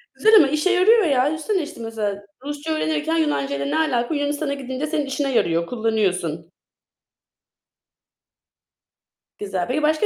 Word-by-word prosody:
Güzel 440 +1 +4
ama 310 -9 +7
işe 305 +6 0
yarıyor 405 +4 +5
ya. 270 -5 +2
Düşünsene 320 +6 -1
işte 305 -4 -9
mesela 215 -3 -4 0.2
Rusça 295 +2 -4
öğrenirken 315 +1 -1
Yunancayla 140 - -1
ne 140 - 0
alaka? 265 -3 0
Yunanistan'a 290 0 -1
gidince 265 +1 -4
senin 300 -2 -2
işine 275 0 -2
yarıyor, 170 -5 +1
kullanıyorsun. 185 -8 -1 2.9
Güzel. 190 -2 -3
Peki 280 +5 -1
başka 310 +5 +2
280 Hz, 130 wpm, -22 LUFS, 215-315 Hz, 2.9 s, ama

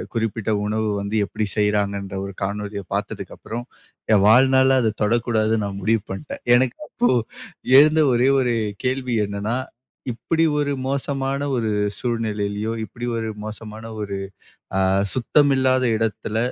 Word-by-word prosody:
குறிப்பிட்ட 115 -1 -1
உணவு 110 +1 0
வந்து 100 +2 -2
எப்டி 110 0 -2
செய்றாங்கன்ற 100 -2 0
ஒரு 100 - -7
காணொளிய 100 0 -3
பார்த்ததுக்கு - - -4
அப்புறம் 120 +2 -6 0.5
என் 100 -2 +5
வாழ்நாள்ல 130 +3 +5
அத 110 -1 0
தொடக்கூடாதுன்னு 110 -1 +1
நான் 100 -1 -5
முடிவு 110 -1 +2
பண்ட்டேன். 95 +10 -7
எனக்கு 125 0 +1
அப்போ 120 - +1 0.7
எழுந்த 155 +2 +5
ஒரே 125 +2 +3
ஒரு 120 -2 +1 0.3
கேள்வி 125 -1 0
என்னன்னா. 100 +4 -2 0.5
இப்படி 165 +7 0
ஒரு 145 -1 0
மோசமான 135 0 -1 0.2
ஒரு 115 -2 0 0.3
சூழ்நிலையிலும், 110 -2 -2
இப்படி 120 +2 -7
ஒரு 110 -1 -2
மோசமான 110 +1 -8 0.2
ஒரு 100 -1 -3 0.6
அ - - +3 0.3
சுத்தமில்லாத 130 0 +3
இடத்துல 110 0 -2
115 Hz, 125 wpm, -22 LUFS, 105-130 Hz, 0.7 s, என்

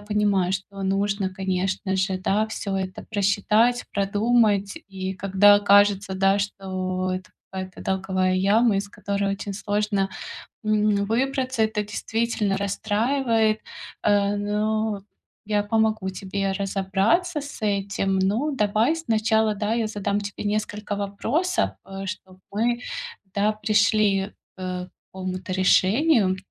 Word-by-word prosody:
понимаю, 205 -3 +1
что 195 +1 -5
нужно, 195 0 0
конечно 190 +1 -1
же, 190 0 0
да, 210 +4 +1
всё 200 -3 -3
это 185 -1 -4
просчитать, 215 +4 +2
продумать. 205 +1 +2
И 190 -1 -4
когда 200 +2 +5
кажется, 200 -1 +4
да, 195 +1 +3
что 185 -2 -2
это 185 0 -5 0.2
какая-то 185 -1 -6
долговая 190 -1 0
яма, 205 +3 +3
из 200 - -4
которой 200 -1 -2
очень 200 +1 -5
сложно, 205 0 0 0.6
м, 210 -1 +2
выбраться, 260 +1 0
это 220 -1 0
действительно 210 0 -1
расстраивает. 220 +2 +1 0.4
А, 205 -1 +3
но 210 0 -1 0.4
я 210 -1 +1
помогу 220 -2 +1
тебе 195 +1 -3
разобраться 200 - 0
с 285 -4 -9
этим. 195 -2 0
Но 215 +11 +1
давай 220 +4 +2
сначала, 220 -7 +1
да, 210 +2 -1
я 230 -2 0
задам 205 -1 -1
тебе 205 0 -6
несколько 210 0 -2
вопросов, 230 - 0
э, 195 0 -7
чтоб 185 0 -8
мы, 235 +4 0 0.6
да, 205 +1 +3
пришли, 210 -2 +2 0.3
э, 185 -1 -4
к - - -23 0.2
какому-то 185 0 -5
решению. 190 - +3
205 Hz, 120 wpm, -24 LUFS, 195-215 Hz, 0.6 s, когда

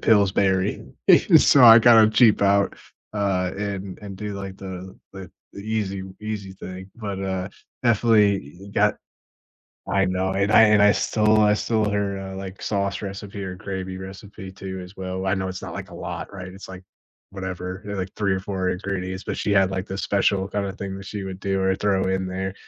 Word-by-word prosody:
Pillsbury. 100 -2 +2 0.5
So 140 - +6
I 115 0 +10
gotta 115 -2 +7
cheap 110 -1 +5
out, 100 0 +3 0.4
uh, 95 -3 0
and 100 -2 -5
and 100 -2 -8
do, 105 +1 -5
like, 95 -1 -7
the 95 -1 -8 0.2
the 95 -2 -9 0.3
easy 100 -2 -3 0.2
easy 105 -3 -5
thing. 95 0 -9
But, 100 -4 -5
uh, 95 -1 -3 0.4
definitely 100 - +2
got - - +3 0.9
I 95 0 +2
know. 95 0 -1
And 100 +2 +1
I 115 - +8
and 105 -1 +5
I 105 - +7
stole 110 +1 +2
I 105 0 +4
stole 110 0 0
her, 100 -1 -1
uh, 95 0 -7
like, 95 0 -8
sauce 100 -1 -2
recipe 100 0 -7
or 95 -1 -5
gravy 95 -2 -5
recipe, 95 0 -9
too, 95 0 -7
as 90 +2 -13
well. 95 0 -4
I 95 - +1
know 95 -1 -2
it's 95 0 -6
not, - - -7
like, - - -7
a - - -10
lot, - - -6
right? 95 -2 -7
It's 95 +2 -11
like 95 0 -10 0.5
whatever, 90 -1 -6
there 100 0 -5
are, - - -5
like, 95 0 -4
3 100 -2 +1
or 95 - -1
4 95 -1 -2
ingredients. 95 0 -4
But - - -4
she - - -1
had, 95 -1 +3
like, 95 -1 -3
the 95 - -5
special 100 -1 +1
kinda 100 -2 -2
thing 95 -1 -6
that 95 - -10
she 105 0 -5
would 95 -1 -7
do 95 -1 -1
or 95 0 +2
throw 95 -1 0
in 95 0 -1
there. 95 +1 -4
95 Hz, 195 wpm, -23 LUFS, 95-100 Hz, 0.9 s, I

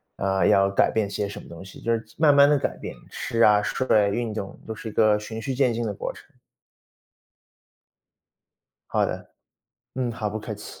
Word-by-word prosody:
呃， 95 -2 +1
要 95 0 +4
改 100 - +3
变 110 -2 0
些 100 +1 -2
什 100 - -8
么 - - -14
东 85 +2 -10
西“， 95 - -12
就 115 - 0
是 115 - -1 0.2
慢 155 -2 +5
慢 140 0 +7
地 150 - +4
改 - - -2
变， - - -7 0.2
吃 115 -2 -2
啊、 105 -2 +6
睡 130 +5 -2 0.2
啊、 - - +1
运 110 +2 -2
动 100 -2 -6
都 110 - -5
是 110 - -9
一 - - -5
个 105 -1 +4
循 110 +1 -7
序 135 +3 -3
渐 130 -2 +2
进 115 0 -2
的 105 - -2
过 - - -5
程。 - - -16 2.6
好 - - +2
的。 - - -5 0.7
嗯， 125 -2 -2
好， 105 -2 -3
不 110 - -4
客 105 - -6
气。 - - -11
110 Hz, 220 characters per minute, -25 LUFS, 100-120 Hz, 2.6 s, 慢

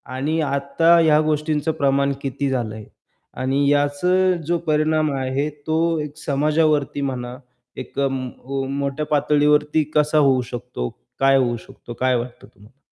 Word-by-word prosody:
आणि 155 +5 -1
आत्ता 140 +4 +2
ह्या 155 -2 +4
गोष्टींचं 155 0 0
प्रमाण 140 0 +2
किती 135 +1 -2
झालं 120 -5 -2
आहे 110 -1 -9 0.6
आणि 135 +2 +1
याचा 145 +5 +2 0.3
जो 175 - +1
परिणाम 155 0 +2
आहे 135 +3 -1 0.2
तो 165 0 +1
एक 150 0 -8
समाजावरती 150 -1 +1
म्हणा, 125 -2 -4 0.4
एक - - -7
अं 135 -1 0 0.3
अं, 135 0 -3
मोठ्या 140 +2 -2
पातळीवरती 150 +1 +2
कसा 150 0 +3
होऊ 135 -3 +4
शकतो? 120 - -4 0.3
काय 135 0 +4
होऊ 120 -3 +1
शकतो? 120 - -11
काय 130 0 +2
वाटतं 120 0 -5
तुम्हाला? 105 +6 -21
140 Hz, 145 wpm, -21 LUFS, 135-155 Hz, 0.6 s, ह्या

